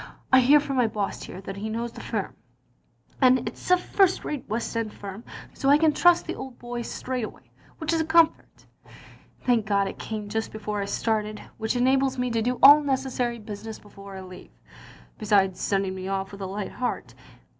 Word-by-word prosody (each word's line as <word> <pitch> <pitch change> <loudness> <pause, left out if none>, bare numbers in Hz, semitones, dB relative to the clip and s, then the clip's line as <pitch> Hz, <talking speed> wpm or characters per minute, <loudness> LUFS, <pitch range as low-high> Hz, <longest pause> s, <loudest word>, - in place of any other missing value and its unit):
I 260 - +9
hear 275 +4 +6
from 275 -2 -3
my 245 -2 +4
boss 205 -2 -3
here 185 - -8
that 195 0 -7
he 215 +2 -4
knows 230 +2 -3
the - - -10
firm, - - -3 0.9
and 255 -1 +6
it - - -3
*s - - -10
a 365 - +6
first 375 +1 +2
rate 290 -7 -5
west 230 +2 -3
end 225 -2 -2
firm, 200 +2 -8 0.3
so 275 - 0
I 285 - +7
can, 310 -1 +3
trust 350 +3 +4
the - - -3
old 265 -2 -8
boy 240 0 -5
straight 250 +1 -4
away, - - -9 0.3
which 320 0 -2
is 325 - +2
a - - -1
comfort. 325 0 +2 0.8
Thank 235 -4 +2
God 200 -1 +2
it - - -7
came 215 -2 -5
just 220 +2 -3
before 210 -1 -4
I - - -2
started, 215 0 -1 0.2
which 220 +2 -1
enables 265 +1 +2
me 250 -1 -1
to 230 -1 0
do 250 +2 0
all 290 +2 +10
necessary 260 -4 -1
business 215 0 -8
before 200 -1 -12
I - - -7
leave, 185 -1 -11 0.7
besides 195 -4 +2
sending 195 -1 0
me 190 0 -6
off 195 0 -2
with 200 0 -10
a 190 - -3
light 200 +1 -5
heart. 250 - -4
230 Hz, 205 wpm, -25 LUFS, 205-265 Hz, 0.9 s, all